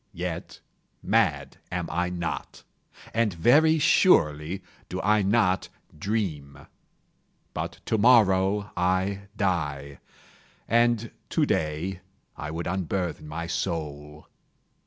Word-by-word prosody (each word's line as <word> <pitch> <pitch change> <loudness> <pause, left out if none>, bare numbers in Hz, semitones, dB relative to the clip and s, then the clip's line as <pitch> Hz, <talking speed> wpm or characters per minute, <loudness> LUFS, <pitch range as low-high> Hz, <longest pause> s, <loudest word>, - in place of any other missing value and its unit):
Yet, 85 -1 -5 0.4
mad 90 -10 +1
am - - -2
I 90 +3 0
not—and 90 +4 -4
very 155 - +5
surely 85 - +3 0.3
do - - -4
I 105 +2 +3
not 100 -2 +2 0.3
dream. 75 -7 -3 0.9
But - - -5
to 110 - 0
morrow 100 -3 +4
I 95 +2 0
die, 75 -8 -2 0.7
and 120 -1 +2 0.2
to - - +2
day 80 +4 -1 0.4
I 75 - -6
would 80 +2 -4
unburthen 90 -2 -2
my 80 +2 -4
soul. 75 -4 -4
90 Hz, 95 wpm, -26 LUFS, 80-105 Hz, 0.9 s, very